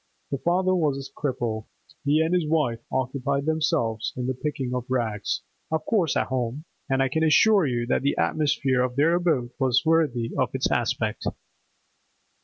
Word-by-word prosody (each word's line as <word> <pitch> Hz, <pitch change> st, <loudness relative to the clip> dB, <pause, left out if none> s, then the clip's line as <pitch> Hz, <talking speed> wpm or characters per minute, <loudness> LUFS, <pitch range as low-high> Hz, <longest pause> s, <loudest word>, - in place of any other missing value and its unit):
The 140 Hz, -, -1 dB
father 185 Hz, +3 st, +2 dB
was 155 Hz, -6 st, +1 dB
a 135 Hz, 0 st, -8 dB
cripple; 120 Hz, -6 st, -2 dB, 0.4 s
he 150 Hz, +2 st, +3 dB
and 160 Hz, +2 st, +1 dB
his 175 Hz, -4 st, +1 dB
wife 150 Hz, -8 st, +1 dB
occupied 140 Hz, +2 st, -1 dB
themselves 150 Hz, -8 st, 0 dB
in 125 Hz, -, -2 dB
the 130 Hz, -, 0 dB
picking 130 Hz, -2 st, -3 dB
of 125 Hz, -1 st, -2 dB
rags—of 125 Hz, +6 st, -3 dB
course 185 Hz, -9 st, +1 dB
at -, -, +1 dB
home—and 135 Hz, +2 st, -2 dB
I -, -, +2 dB
can 160 Hz, +5 st, 0 dB
assure 190 Hz, +3 st, +5 dB
you 120 Hz, -2 st, -1 dB
that 120 Hz, -, +1 dB
the 140 Hz, +1 st, 0 dB
atmosphere 140 Hz, -4 st, +1 dB
of 125 Hz, -1 st, -1 dB
their 150 Hz, +5 st, +3 dB
abode 160 Hz, -9 st, +1 dB
was 130 Hz, +1 st, +2 dB
worthy 150 Hz, -8 st, +2 dB
of -, -, 0 dB
its -, -, 0 dB
aspect. -, -, -1 dB
140 Hz, 165 wpm, -25 LUFS, 125-160 Hz, 0.4 s, assure